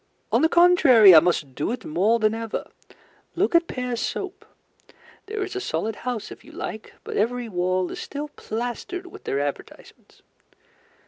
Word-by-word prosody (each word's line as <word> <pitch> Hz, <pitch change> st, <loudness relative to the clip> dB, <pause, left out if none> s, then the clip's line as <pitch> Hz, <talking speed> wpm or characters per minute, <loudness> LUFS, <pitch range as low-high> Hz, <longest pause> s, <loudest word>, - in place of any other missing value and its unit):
On -, -, +3 dB
the 320 Hz, -, +4 dB
contrary, 280 Hz, -, +7 dB
I 160 Hz, -, +11 dB
must 155 Hz, -5 st, -1 dB
do 145 Hz, -, -2 dB
it 245 Hz, -, -5 dB
more 195 Hz, +9 st, +2 dB
than 215 Hz, -1 st, +1 dB
ever. 225 Hz, -1 st, -4 dB, 0.7 s
Look 370 Hz, +3 st, +1 dB
at 340 Hz, 0 st, +4 dB
Pears's 250 Hz, -2 st, -3 dB
Soap. 390 Hz, -1 st, -5 dB, 0.8 s
There 425 Hz, 0 st, -3 dB
is 390 Hz, 0 st, -6 dB
a 385 Hz, -, -2 dB
solid 220 Hz, -, -3 dB
house 245 Hz, -4 st, -5 dB
if -, -, -11 dB
you 300 Hz, -, -15 dB
like, 220 Hz, -9 st, -7 dB
but -, -, -5 dB
every 240 Hz, +3 st, 0 dB
wall 185 Hz, -2 st, -1 dB
is -, -, -7 dB
still 295 Hz, +1 st, -6 dB
plastered 245 Hz, -, -5 dB
with 360 Hz, -, -13 dB
their 140 Hz, -, -1 dB
advertisements. 145 Hz, 0 st, -7 dB
235 Hz, 170 wpm, -24 LUFS, 200-330 Hz, 0.8 s, I